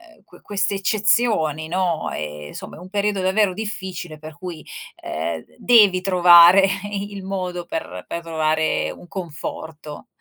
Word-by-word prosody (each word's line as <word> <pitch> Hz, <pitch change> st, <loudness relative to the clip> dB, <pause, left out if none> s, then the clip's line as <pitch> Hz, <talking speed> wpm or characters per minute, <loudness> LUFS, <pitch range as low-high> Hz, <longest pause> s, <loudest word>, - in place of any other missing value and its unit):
ehm, -, -, -27 dB
que -, -, -19 dB
queste 200 Hz, 0 st, -1 dB
eccezioni, 195 Hz, -6 st, +1 dB
no? 175 Hz, -1 st, -1 dB
E, 75 Hz, -1 st, -6 dB
insomma, -, -, -9 dB
è -, -, -12 dB
un 180 Hz, +2 st, -11 dB
periodo 205 Hz, 0 st, 0 dB
davvero 190 Hz, +1 st, +2 dB
difficile, 185 Hz, -5 st, -6 dB
per 155 Hz, 0 st, -11 dB
cui, 175 Hz, -3 st, -8 dB, 0.4 s
ehm, 80 Hz, +1 st, -4 dB, 0.2 s
devi 210 Hz, -6 st, +5 dB
trovare 180 Hz, 0 st, +7 dB, 0.3 s
i 205 Hz, 0 st, -4 dB
il 195 Hz, -1 st, -7 dB
modo 180 Hz, -2 st, -4 dB
per 90 Hz, -, -6 dB
per 170 Hz, -, -4 dB
trovare 155 Hz, -1 st, 0 dB
un 175 Hz, -, -13 dB
conforto. 160 Hz, -3 st, -7 dB
180 Hz, 145 wpm, -21 LUFS, 155-195 Hz, 0.4 s, trovare